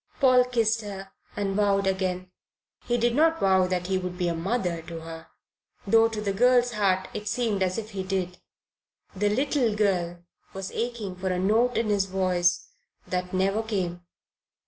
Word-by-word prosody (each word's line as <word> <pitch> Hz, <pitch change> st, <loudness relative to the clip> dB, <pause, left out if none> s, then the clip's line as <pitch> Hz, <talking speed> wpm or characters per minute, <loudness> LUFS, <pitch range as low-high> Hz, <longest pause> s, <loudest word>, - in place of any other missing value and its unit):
Paul 255 Hz, -3 st, +5 dB
kissed 230 Hz, -2 st, +1 dB
her 195 Hz, -2 st, -8 dB, 0.2 s
and 195 Hz, -1 st, -2 dB
vowed 200 Hz, -1 st, +2 dB
again. 185 Hz, -1 st, -1 dB, 0.6 s
He 240 Hz, -, +1 dB
did 240 Hz, 0 st, +1 dB
not 325 Hz, +4 st, +3 dB
vow 190 Hz, -1 st, +3 dB
that 180 Hz, -1 st, -2 dB
he 190 Hz, 0 st, 0 dB
would 180 Hz, -1 st, -5 dB
be 180 Hz, -1 st, 0 dB
a -, -, -1 dB
mother 175 Hz, -1 st, -2 dB
to 165 Hz, -1 st, -7 dB
her, 165 Hz, 0 st, -9 dB, 0.6 s
though 225 Hz, +3 st, +5 dB
to 225 Hz, -1 st, -5 dB
the 200 Hz, -2 st, -1 dB
girl's 245 Hz, +3 st, +4 dB
heart 190 Hz, -4 st, +1 dB
it 210 Hz, -, -6 dB
seemed 215 Hz, -3 st, -1 dB
as 185 Hz, -1 st, 0 dB
if 220 Hz, -1 st, -5 dB
he 195 Hz, -2 st, -4 dB
did. 185 Hz, -1 st, -3 dB, 0.8 s
The 205 Hz, +2 st, +1 dB
little 255 Hz, -1 st, +1 dB
girl 175 Hz, -4 st, 0 dB, 0.3 s
was 195 Hz, 0 st, -5 dB
aching 230 Hz, -5 st, -4 dB
for 190 Hz, +1 st, -2 dB
a 180 Hz, -, 0 dB
note 220 Hz, +7 st, +2 dB
in 230 Hz, -2 st, 0 dB
his 200 Hz, -2 st, +2 dB
voice 185 Hz, -2 st, +1 dB, 0.4 s
that 180 Hz, 0 st, -2 dB
never 195 Hz, +3 st, +1 dB
came. 185 Hz, -6 st, -3 dB
195 Hz, 175 wpm, -26 LUFS, 185-225 Hz, 0.8 s, Paul